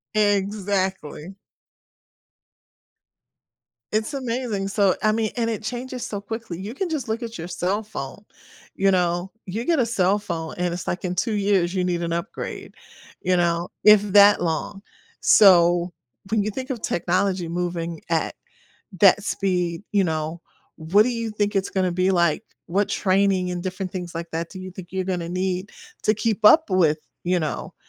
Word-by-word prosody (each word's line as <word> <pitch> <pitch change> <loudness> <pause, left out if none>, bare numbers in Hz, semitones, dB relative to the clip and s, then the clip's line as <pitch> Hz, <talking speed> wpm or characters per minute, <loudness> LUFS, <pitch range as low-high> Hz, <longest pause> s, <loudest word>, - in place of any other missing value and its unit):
Exactly. 195 -4 -1 2.6
It's 220 +6 -1
amazing, 235 -6 -2
so, 200 -2 +3
I 215 - +4
mean 220 0 0
and 230 -1 0
it 220 - -4
changes 245 +3 -5
so 205 - -4
quickly; 220 -4 -6
you 205 +5 -6
can 355 +5 -3
just 290 -6 -3
look 225 +2 -2
at 230 -3 -6
your 165 - -6
cell 190 +4 -1
phone. 200 -1 -7 0.5
You 195 0 +3
know? 180 0 +1
You 215 +6 -4
get 335 -2 +2
a 245 - +3
cell 200 -3 +2
phone 165 -5 -5
and 175 -1 -1
it's, 175 - -6
like, 185 +2 -2
in 180 - -1
2 215 +5 -1
years, 195 -3 +1
you 185 - +1
need 175 -1 -1
an 170 -1 -2
upgrade, 170 0 -5 0.5
you 180 0 +2
know, 170 0 +1
if 210 -1 +8
that 205 0 +7
long. 175 +4 -2 0.4
So, 175 -3 +5 0.4
when 220 - +2
you 215 - -1
think 260 +5 -5
of 235 -4 -4
technology 185 +1 0
moving 170 -1 -3
at 165 -1 0 0.7
that 200 +1 +6
speed, 180 -3 -1
you 200 -2 +3
know, 160 0 -2 0.4
what 175 +6 +4
do 250 - 0
you 230 -2 -2
think 205 -1 -1
it's 195 - 0
gonna 185 -2 0
be 185 +2 +1
like? 170 +3 +2 0.2
What 195 +4 0
training 190 -1 +1
and 180 0 -3
different 185 0 -4
things 175 -2 -6
like 170 0 -5
that 165 +1 -4
do 190 - -9
you 185 0 -7
think 180 0 -11
you're 190 0 -1
gonna 180 -3 -2
need 185 +2 -2 0.3
to 215 - +4
keep 220 0 -1
up 310 - +7
with, 165 -5 +3 0.3
you 180 0 +1
know, 155 - -4
190 Hz, 170 wpm, -23 LUFS, 175-210 Hz, 2.6 s, if